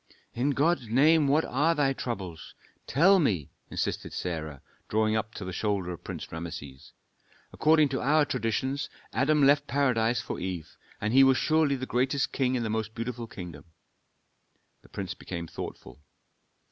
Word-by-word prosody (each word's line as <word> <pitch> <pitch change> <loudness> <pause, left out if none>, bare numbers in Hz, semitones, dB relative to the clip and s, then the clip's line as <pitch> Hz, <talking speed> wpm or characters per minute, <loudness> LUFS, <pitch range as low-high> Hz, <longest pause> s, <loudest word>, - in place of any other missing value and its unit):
"In 125 +4 0
God's 145 -2 +1
name, 150 +5 +5
what 150 +4 +3
are 155 +6 +2
thy 140 -3 +2
troubles? 95 -11 -6 0.3
Tell 185 +9 +5
me," 95 - 0 0.2
insisted - - -3
Sarah, 80 -5 -4 0.3
drawing 110 0 +2
up 110 0 -2
to 100 - -6
the 95 - -5
shoulder 100 -3 -1
of 85 - -8
Prince - - -7
Rameses. 75 -5 -8 0.6
"According 155 -2 +4
to 135 - -2
our 150 +3 +4
traditions, 130 +3 -1 0.2
Adam 145 +2 +3
left 145 +1 +4
Paradise 125 -4 +2
for - - -5
Eve; 90 -3 -5 0.2
and 105 +2 -1
he 135 +1 +8
was 135 -1 +5
surely 155 -3 +2
the 130 -1 -4
greatest 130 +2 0
king 130 -1 +1
in 120 - -1
the - - -1
most 110 0 -3
beautiful 120 0 -4
kingdom." 90 -8 -9 1.2
The - - -20
prince 95 -2 -5
became 85 -3 -6
thoughtful. 80 - -8
125 Hz, 160 wpm, -28 LUFS, 95-140 Hz, 1.2 s, he